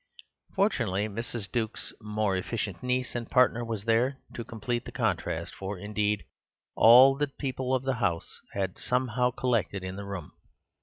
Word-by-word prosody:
Fortunately, 115 - +1
Mrs. 110 0 -5
Duke's 115 -2 -2
more 105 -2 0
efficient 100 0 -3
niece 125 0 -1
and 120 -1 -4
partner 125 -2 +4
was 110 -3 -4
there 120 +4 +2 0.2
to 120 - -5
complete 120 +2 -3
the - - -7
contract; 90 -7 -1
for, 95 +1 -5
indeed, 105 +1 -1 0.5
all 125 +4 +8
the 145 +1 0
people 130 -2 -2
of 130 - -1
the 135 0 +1
house 85 -5 -1
had 95 -2 -2
somehow 125 -1 +1
collected 110 -7 -1
in 95 +1 -5
the 100 - -6
room. 95 -5 -6
115 Hz, 155 wpm, -28 LUFS, 100-125 Hz, 0.5 s, all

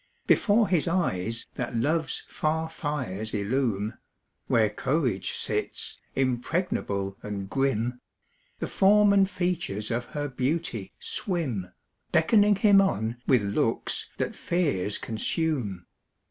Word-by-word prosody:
Before 215 0 +4
his 175 -4 +1
eyes 115 - 0
that 125 -1 -4
love's 155 +6 0
far 160 +1 -1
fires 120 - -3
illume 110 0 -1 0.5
Where 110 -2 +4
courage 120 - -1
sits, - - -3 0.2
impregnable 125 - -1
and 100 -2 -5
grim 125 0 0 0.6
The - - -3
form 205 +1 +5
and 195 -1 +4
features 175 - -2
of 120 +1 -1
her 145 -1 -3
beauty 145 +5 -2
swim, 170 - -3 0.4
Beckoning 210 -2 +5
him 200 0 +6
on 115 - 0
with 125 -6 +4
looks 100 0 -1
that - - -2
fears 140 - 0
consume. 110 - -2
135 Hz, 110 wpm, -27 LUFS, 105-175 Hz, 0.6 s, him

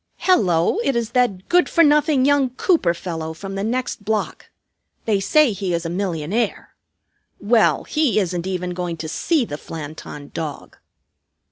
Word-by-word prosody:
"Hello! 190 - +2
It 275 - 0
is 235 -1 -1
that 245 -8 0
good 355 +1 +3
for 335 - +4
nothing 295 -2 +3
young 285 -2 +3
Cooper 250 - +1
fellow 160 -2 -5
from 195 +3 -7
the 195 0 -3
next 245 -1 -2
block. 215 +1 -3 0.6
They 210 -3 +2
say 295 +7 +3
he 190 -3 -2
is 170 0 -3
a 165 - -3
millionaire. 190 +3 -2 0.7
Well, 220 +2 +3
he 300 -7 0
isn't 180 -2 -2
even 180 -1 -3
going 175 -2 -4
to 160 0 -5
see 290 - 0
the 145 -7 -6
Flanton 150 -2 -9
Dog." 155 -4 -6
195 Hz, 155 wpm, -21 LUFS, 170-255 Hz, 0.7 s, for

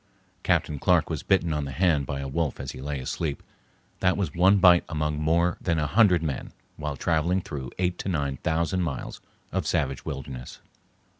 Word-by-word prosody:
Captain 75 -2 +1
Clark 85 0 +3
was 80 - -2
bitten 85 -4 +2
on 75 -1 -1
the 70 - -5
hand 80 -5 +2
by 70 -1 -3
a 70 - -4
wolf 75 +1 -2
as 65 - -5
he - - -9
lay 70 0 -3
asleep; 70 +3 -3 0.6
that 95 0 +2
was 90 -8 -1
one 95 +4 +5
bite 90 -2 +6
among 75 -1 -1
more 85 +3 +2
than 85 -2 0
a 75 - +1
hundred 90 0 +4
men 70 -5 -3 0.2
while 75 -2 -4
traveling 85 +5 +1
through 70 -8 -6
eight 90 -1 -1
to - - -3
nine 70 -6 -1
thousand 85 +3 0
miles 75 -7 -4 0.3
of - - -1
savage 65 -2 0
wilderness. 65 -2 -7
80 Hz, 190 wpm, -26 LUFS, 70-90 Hz, 0.6 s, bite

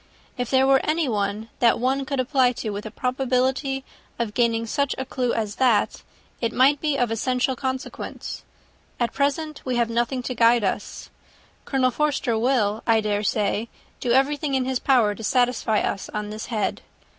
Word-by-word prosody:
If 245 -1 -3
there 265 0 +4
were 270 0 +4
anyone 220 -9 -1
that 235 -2 +4
one 265 +3 0
could 275 0 -2
apply 255 -1 +3
to, 225 -3 -4
with 205 +2 -5
a - - -6
probability 260 +2 0 0.3
of 230 -3 -2
gaining 230 -1 +1
such 280 +4 -1
a 265 - -3
clue 250 -2 -1
as 215 -2 -2
that, 240 -6 +2 0.4
it 230 - 0
might 275 +3 +4
be 300 -3 0
of 245 -3 +1
essential 250 +3 0
consequence. 260 +1 -5 0.6
At 240 -1 0
present 290 +2 -1
we 255 -1 -2
have 235 -1 +1
nothing 240 +2 0
to 255 - -3
guide 235 -1 +4
us. 200 +1 -3 0.5
Colonel 260 -2 +1
Forster 285 -4 0
will, 220 -3 +1
I 225 -1 +5
dare 210 -1 0
say, 210 +2 0 0.3
do 245 - -1
everything 275 +2 +2
in 260 -1 +1
his 260 -1 -1
power 240 -6 +3
to 225 - -10
satisfy 245 -2 +2
us 195 - -3
on 210 0 -4
this 215 +1 -6
head. 215 -4 -2
250 Hz, 175 wpm, -24 LUFS, 225-265 Hz, 0.6 s, I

